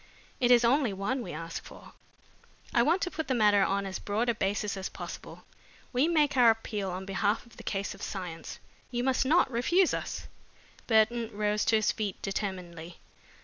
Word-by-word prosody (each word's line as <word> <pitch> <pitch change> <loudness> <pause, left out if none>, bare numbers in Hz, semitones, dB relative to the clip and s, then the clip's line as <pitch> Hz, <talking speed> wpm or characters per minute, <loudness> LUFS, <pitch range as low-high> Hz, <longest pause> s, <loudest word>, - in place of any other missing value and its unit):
It 245 -2 +3
is 240 -1 +6
only 250 -3 +3
one 200 +7 -2
we 180 - -6
ask 165 +2 -6
for. - - -13 0.8
I 235 - +5
want 330 +9 +2
to 360 - -2
put 320 - -4
the 260 - +1
matter 210 -3 +5
on 200 +1 0
as 190 -1 -4
broad 220 +4 -1
a - - +3
basis 205 0 -1
as 190 -1 -4
possible. - - -9 0.5
We 255 +5 +3
make 300 -4 +2
our 245 -3 +7
appeal 215 -3 -1
on 185 +1 -5
behalf 200 +3 0
of 235 - -19
the - - -10
cause 200 0 -2
of - - -14
science. 180 -4 -6 0.3
You 245 -1 -2
must 260 0 +1
not 315 -2 +4
refuse 340 +11 +3
us." - - -4 0.6
Burton 225 0 +3
rose 210 0 0
to 225 - +3
his 215 -1 +3
feet 210 -3 -4
determinedly. 180 -4 -4
215 Hz, 190 wpm, -29 LUFS, 195-245 Hz, 0.8 s, our